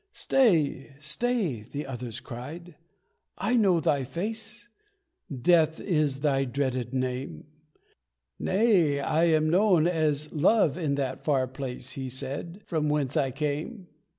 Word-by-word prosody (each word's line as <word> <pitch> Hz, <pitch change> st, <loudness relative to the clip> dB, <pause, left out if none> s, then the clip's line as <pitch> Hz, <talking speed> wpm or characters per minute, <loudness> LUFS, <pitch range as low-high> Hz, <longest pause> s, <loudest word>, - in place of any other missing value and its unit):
"Stay! 155 Hz, -, +2 dB
Stay!" 165 Hz, -, -1 dB
the 140 Hz, +7 st, -6 dB
other 125 Hz, -2 st, -6 dB
cried. 150 Hz, +8 st, -8 dB, 0.6 s
"I 215 Hz, +6 st, 0 dB
know 195 Hz, -7 st, +4 dB
thy 145 Hz, -3 st, +1 dB
face! 215 Hz, -, -5 dB, 0.6 s
Death 160 Hz, +4 st, +3 dB
is 150 Hz, -6 st, 0 dB
thy 140 Hz, -2 st, +2 dB
dreaded 130 Hz, -2 st, -2 dB
name!" 130 Hz, -, -3 dB, 0.9 s
"Nay 185 Hz, -8 st, +3 dB
I 155 Hz, +4 st, +2 dB
am 155 Hz, -1 st, +3 dB
known 185 Hz, -3 st, +4 dB
as 155 Hz, -3 st, 0 dB
'Love' 160 Hz, -1 st, +3 dB
in 155 Hz, -5 st, -1 dB
that 135 Hz, -2 st, -3 dB
far 135 Hz, -4 st, +2 dB
place," 130 Hz, -1 st, -6 dB
He 130 Hz, -1 st, -5 dB
said, 140 Hz, +9 st, -5 dB
"from 155 Hz, -2 st, -1 dB
whence 145 Hz, -2 st, 0 dB
I 140 Hz, -4 st, +2 dB
came." 155 Hz, -, -4 dB
150 Hz, 125 wpm, -27 LUFS, 135-175 Hz, 0.9 s, know